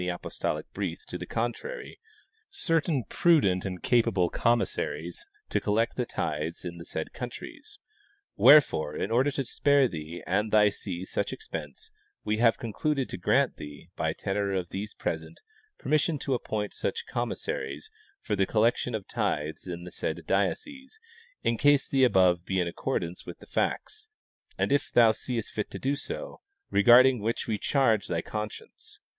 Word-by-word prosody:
apostolic 90 - -3
brief - - -4
to - - -8
the - - -5
contrary, 430 - -4 0.5
certain 165 - 0
prudent 135 - +3
and 90 -2 -5
capable 115 -7 +2
com 120 0 +3
mib'saries - - -4 0.2
to - - 0
collect 110 +3 +1
the 125 -2 -2
tithes 80 +2 -3
in 85 -1 -6
the 85 - -9
said 80 - -5
countries. 280 - -8 0.6
Wherefore, 110 - +6
in - - -2
order 130 +5 +3
to 135 -1 -2
spare 140 +2 +3
thee 80 -2 -7
and 105 +4 0
thy 105 -1 +6
see 95 -3 -6
such - - -2
expense, 75 -2 -7 0.3
we 110 0 0
have 115 0 +4
con 115 -3 -6
cluded 145 -1 0
to - - -5
grant - - +2
thee, 75 -1 -10
by - - 0
tenor 100 0 -2
of 90 -3 -2
these 105 +3 -5
present, - - -4 0.4
permission 155 +1 +1
to 135 0 -2
appoint 110 -4 -2
such - - -3
commissaries 70 +3 -4 0.3
for 105 - -1
the 95 -1 +1
collection 115 +2 +1
of 105 -3 -5
tithes 75 +4 -2
in 85 -1 -5
the 90 - -9
said - - -3
diocese, 270 - -2 0.4
in 115 - +1
case 145 -1 +4
the 135 -1 +2
above 90 -7 +4
be 95 +1 -1
in 90 - +1
accordance 85 0 -3
with - - -7
the - - -15
facts, 435 +1 -2 0.5
and - - 0
if 145 - +1
thou 115 -2 +6
seest 115 0 -4
fit 105 - -3
so - - -8
to 140 +2 0
do, - - -6 0.3
regarding 120 +5 +7
which 115 +3 -2
we 110 -2 -2
charge 115 -8 +2
thy 85 -1 -1
con 105 0 -3
science. - - -13
110 Hz, 165 wpm, -28 LUFS, 90-135 Hz, 0.6 s, regarding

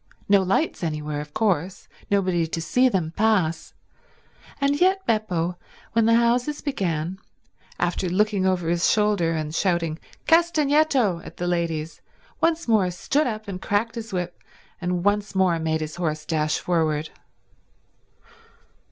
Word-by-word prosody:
No 200 -1 +5
lights 195 - 0
anywhere, 150 -2 -3
of 150 0 -10
course, 190 -2 -1 0.2
nobody 185 -4 +1
to 165 - -4
see 250 +10 +3
them 175 -7 -1
pass; 195 -7 +1 0.8
and 280 +2 +1
yet 380 +1 +3
Beppo, 180 -6 -1 0.3
when 225 -1 +3
the 230 - +5
houses 245 +5 +2
began, 185 - -2 0.6
after 175 +1 0
looking 205 +1 +1
over 185 -3 +1
his 170 +1 +2
shoulder 205 -6 +2
and 155 -1 -3
shouting 170 -3 0 0.3
"Castagneto" 300 - +3
at - - -11
the 175 - -3
ladies, 165 -3 -2 0.4
once 330 -1 +1
more 210 -5 +3
stood 275 - 0
up 215 -2 -4
and 190 -2 -6
cracked 215 +3 0
his 230 -1 -7
whip 180 -2 -4 0.4
and 180 -1 -1
once 205 0 0
more 185 -3 +3
made 160 0 -1
his 155 +1 -5
horse 155 -3 -2
dash 155 -1 0
forward. 155 -3 0
185 Hz, 140 wpm, -24 LUFS, 165-225 Hz, 0.8 s, No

